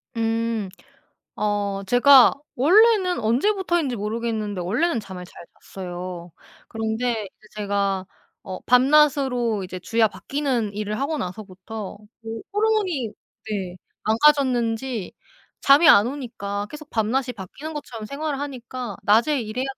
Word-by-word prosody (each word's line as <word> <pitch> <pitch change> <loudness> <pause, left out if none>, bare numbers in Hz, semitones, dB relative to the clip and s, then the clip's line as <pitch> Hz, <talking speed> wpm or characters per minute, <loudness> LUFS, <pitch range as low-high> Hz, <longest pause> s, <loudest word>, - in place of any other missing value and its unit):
음. 225 -2 -1 0.7
어 205 -1 -1
제가 255 +2 +7 0.2
원래는 375 - +4
언제부터인지 335 - +1
모르겠는데 215 -2 -3
원래는 240 - 0
잠을 185 -4 -8
잘 175 - -13 0.2
잤어요. 180 -2 -7 0.4
그런데 225 0 -2
이제 215 +3 -22
제가 200 -2 -1 0.4
어 185 -1 -6
밤낮으로 255 -4 +3
이제 185 0 -7
주야 225 +4 +2
바뀌는 250 -3 -2
일을 210 +1 -3
하고 295 +3 -1
나서부터 195 0 -7
어 - - -15 0.6
호르몬이 410 - +1 0.4
네. 190 -4 -4 0.3
망가졌는지 240 -3 +2 0.5
잠이 290 +4 +7
안 205 - +7
오니까 210 -7 -5
계속 300 0 -10
밤낮이 245 +4 0
바뀌는 260 - -8
것처럼 240 -7 -7
생활하니까 270 -5 -5
낮에 230 +7 +3
일해야 225 +3 -3
230 Hz, 280 characters per minute, -23 LUFS, 205-280 Hz, 0.7 s, 제가